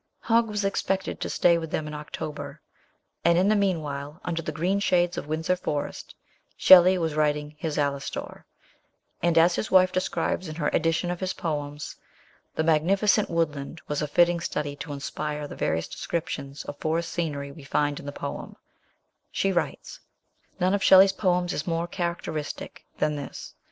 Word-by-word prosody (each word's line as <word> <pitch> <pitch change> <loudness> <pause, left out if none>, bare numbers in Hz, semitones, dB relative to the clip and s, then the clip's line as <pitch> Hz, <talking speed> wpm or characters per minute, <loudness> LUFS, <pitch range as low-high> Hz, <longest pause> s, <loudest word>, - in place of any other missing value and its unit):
Hogg 230 0 +3
was 210 -2 -2
expected 195 -1 -1
to - - -2
stay 170 -1 +3
with 160 -1 -5
them 155 - -2
in 150 - -6
October, 150 0 -6 0.6
and 170 0 +4
in 190 +3 +4
the 215 - +4
meanwhile, 155 -6 -1
under 165 -1 -1
the 155 - -4
green 180 +6 0
shades 175 -2 +2
of - - -5
Windsor 160 +4 0
Forest, 150 -5 -4 0.4
Shelley 185 0 +8
was 165 -3 -1
writing 150 -1 0
his 155 -2 -3
Alastor, 140 -1 -3 0.8
and, 170 0 +2
as 170 +2 +6
his 215 - -2
wife 185 -1 +5
describes 185 0 -1
in 155 - -6
her 150 -3 0
edition 165 +2 +1
of 180 - -4
his 185 -1 -2
poems, 145 -3 -4 0.3
*' - - -34
The 160 - +1
magnificent 190 +7 +3
woodland 160 -2 -2
was 150 - -1
a 150 - -1
fitting 175 +3 +3
study 145 -3 -3
to 145 - -7
inspire 150 +1 -4
the - - -9
various 80 +1 -1
descriptions 150 -5 -4
of 145 - -7
forest 165 +1 -1
scenery 145 -5 -3
we 140 +1 -12
find 145 +1 0
in - - -10
the - - -3
poem/' 140 0 -6 0.7
She 195 - 0
writes: 175 -2 -3 0.6
None 185 +1 +2
of 200 - +1
Shelley's 190 0 +7
poems 180 -2 +1
is 150 - -3
more 165 0 0
characteristic 170 -4 -4
than 150 -1 0
this. 140 - -8
165 Hz, 170 wpm, -26 LUFS, 150-180 Hz, 0.8 s, Shelley